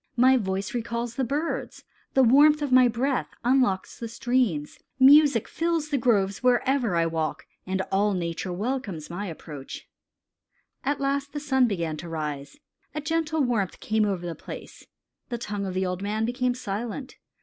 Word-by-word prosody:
My 260 +2 +6
voice 195 -4 -2
recalls 235 0 -3
the 265 - -1
birds. 290 +7 -3 0.3
The 265 - +6
warmth 295 +5 +6
of 285 - -2
my 255 0 +7
breath 250 +3 0 0.2
unlocks 245 -6 +1
the 230 - -4
streams. 230 - -1 0.2
Music 280 -3 +6
fills 330 -2 -1
the 285 - +1
groves 200 -5 +1
wherever 250 -3 +2
I 165 0 +3
walk, 160 -1 -2 0.2
and 190 0 -1
all 200 +1 +2
nature 170 +1 -3
welcomes 200 - -3
my 200 +4 -4
approach." 150 -4 -8 1.0
At 285 +1 0
length 280 +1 -1
the 295 - -3
sun 265 -4 +2
began 170 -7 -2
to 170 +2 -8
rise. 150 -3 -5 0.4
A - - -1
gentle 320 0 0
warmth 225 -7 -1
came 220 -1 +1
over 190 -4 -2
the 170 - -3
place. - - -10 0.4
The 240 - -2
tongue 205 -3 -4
of 185 - -5
the 190 0 +1
old 180 0 -3
man 215 +2 -1
became 250 +1 0
silent. 235 +4 -5
235 Hz, 165 wpm, -26 LUFS, 190-265 Hz, 1.0 s, my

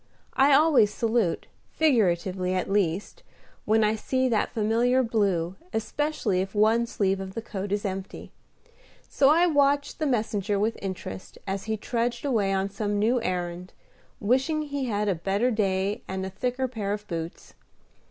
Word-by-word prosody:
I 275 +2 +4
always 280 -7 +5
salute, 225 -6 0 0.3
figuratively 185 - +1
at 185 - -1
least, 195 - -1 0.4
when 220 +1 +3
I 210 0 +3
see 260 +4 0
that 220 -3 +1
familiar 235 +4 +2
blue, 195 -6 0 0.2
especially 225 -4 -1
if 195 +2 -5
one 225 +3 +3
sleeve 195 -5 0
of 190 0 -7
the 230 - -3
coat 200 -3 -5
is 205 +1 -1
empty; 190 0 -5 0.8
so 270 - +3
I 335 +4 +5
watched 285 -3 +2
the 310 - 0
messenger 210 -5 0
with 220 +2 0
interest 180 - -6
as 195 0 -3
he 220 0 -1
trudged 235 +3 -2
away 215 -8 +1
on 195 0 0
some 205 +1 -2
new 230 +4 +2
errand, 180 -2 -3 0.5
wishing 265 +8 +1
he 285 -2 -3
had 210 -3 -1
a 200 - +3
better 195 +8 0
day 200 0 0
and 190 0 -3
a 190 - -5
thicker 250 +6 -2
pair 210 -5 -3
of 210 0 -6
boots. 165 -1 -6
210 Hz, 160 wpm, -26 LUFS, 195-245 Hz, 0.8 s, always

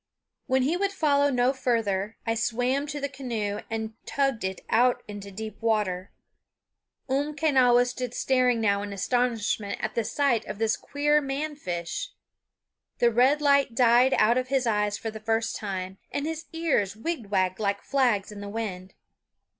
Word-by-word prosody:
When 260 0 +2
he 300 +6 +1
would 395 +2 0
follow 285 -5 +3
no 250 0 +2
farther 225 -6 -1
I 225 - +1
swam 245 +5 0
to 295 0 -4
the 280 - -1
canoe 235 -7 -3
and 220 -1 -3
tugged 275 -6 0
it 190 0 -3
out 245 +2 +3
into 205 -1 -8
deep 215 +3 -8
water. 205 -5 0 1.0
Umquenawis 265 -3 +3
stood 250 -1 -5
staring 255 -2 +2
now 200 -2 +2
in 205 0 -5
astonishment 220 -1 0
at 220 - -3
the 230 - 0
sight 275 -1 +1
of - - -5
this 225 0 +1
queer 295 +1 +1
man 290 +2 -3
fish. 180 - -4 0.9
The 240 -1 +3
red 265 +6 +3
light 280 -4 +3
died 245 +2 +5
out 235 +4 +4
of 255 - -4
his 265 -1 +1
eyes 210 -2 +1
for 225 - -5
the 220 - -8
first 225 +1 -1
time, 190 -2 -5
and 285 - -2
his 320 0 -4
ears 300 - 0
wigwagged 205 - -1
like 200 -1 -1
flags 245 -8 +1
in 205 -1 -8
the 205 - -6
wind. 195 -4 -5
235 Hz, 160 wpm, -26 LUFS, 210-275 Hz, 1.0 s, died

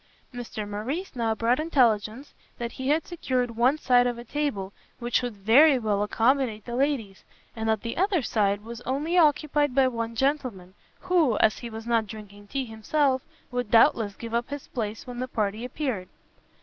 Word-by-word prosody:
Mr 230 -3 -6
Morrice 260 - -4
now 225 -2 0
brought 235 +4 +1
intelligence 250 -4 +1 0.2
that 235 -1 -4
he 260 - -5
had 305 +2 +2
secured 255 -8 -2
one 245 +6 +2
side 245 -4 +4
of 240 -1 -2
a 235 - -8
table 240 -8 -3 0.2
which 240 0 0
would 245 -3 -4
very 260 +9 +6
well 210 -4 0
accommodate 225 0 +1
the 240 - -5
ladies; 250 -8 -1 0.3
and 225 -1 -2
that 220 -2 +1
the 230 - -4
other 370 -4 +1
side 205 -3 0
was 230 +1 -8
only 290 +7 -2
occupied 295 -4 +3
by 270 -1 +5
one 230 -2 -3
gentleman, 250 -9 -1 0.3
who, 340 - +2
as 215 - +3
he 235 - -6
was 225 0 -8
not 230 -2 +1
drinking 205 -1 -11
tea 270 +4 -2
himself, 260 +4 0 0.3
would 245 -3 -2
doubtless 225 -2 +4
give 230 +2 -8
up 235 +1 -1
his 285 -1 -6
place 220 -2 -4
when 245 -1 -7
the 255 - -2
party 215 -2 -2
appeared. 250 -7 -3
240 Hz, 180 wpm, -26 LUFS, 220-275 Hz, 0.3 s, very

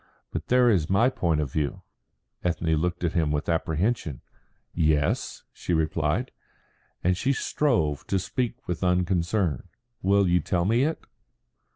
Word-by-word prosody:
"But - - -4
there 125 0 +4
is 90 -9 +2
my 110 +6 +4
point 85 -12 0
of 70 -3 -3
view." 75 -3 -2 0.6
Ethne 85 -2 0
looked 90 +3 -1
at 85 - 0
him 80 -3 +1
with 75 +1 -1
apprehension. 80 - -1 0.5
"Yes?" 75 -3 0
she 90 - -2
replied, 80 - 0 0.7
and 90 +1 +3
she 135 +9 +1
strove 85 - 0
to 100 - +1
speak 120 +6 -3
with 90 +1 -3
unconcern. 90 - +1 0.3
"Will 100 0 +3
you 90 0 +3
tell 85 +2 0
me 115 +6 +3
it?" 160 +1 -3
90 Hz, 145 wpm, -26 LUFS, 80-105 Hz, 0.7 s, there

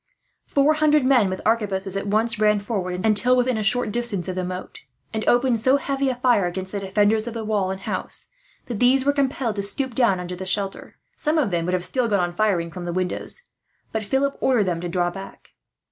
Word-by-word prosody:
Four 285 +2 +3
hundred 305 -2 +3
men 250 -7 +4
with 185 - -5
arquebuses 200 -4 0
at 195 +1 -3
once 220 +2 0
ran 210 -1 +3
forward, 190 -3 -3
until 220 +4 +4
within 250 0 +1
a 220 - -1
short 220 +1 +2
distance 220 -6 -1
of 185 - -2
the 185 0 -3
moat; 180 +1 -6 0.3
and 220 0 -2
opened 245 -1 +3
so 260 +5 +4
heavy 275 -1 -1
a 255 - -1
fire, 245 -7 +2
against 185 +1 -5
the 205 - -3
defenders 205 +3 +1
of 235 - -5
the 225 -1 -4
wall 205 -3 0
and 190 0 -5
house, - - -2 0.4
that 235 -5 -5
these 260 +2 +4
were 285 - +3
compelled 265 -5 -1
to - - 0
stoop 255 +6 -1
down 230 -7 +2
under 180 +1 -6
shelter. 195 +1 -3 0.2
Some 305 +2 0
of 275 -10 +1
them 170 -1 0
would 180 +1 0
have 180 0 -2
still 250 +5 +1
gone 205 -3 +1
on 175 -1 -1
firing 175 -4 0
from 180 0 -7
the 175 - -3
windows, 185 - -3 0.5
but 220 - -2
Philip 270 +6 0
ordered 250 -5 +3
them 175 -3 -2
to 175 - -4
draw 175 0 0
back. 195 +2 -11
210 Hz, 225 wpm, -23 LUFS, 185-250 Hz, 0.5 s, men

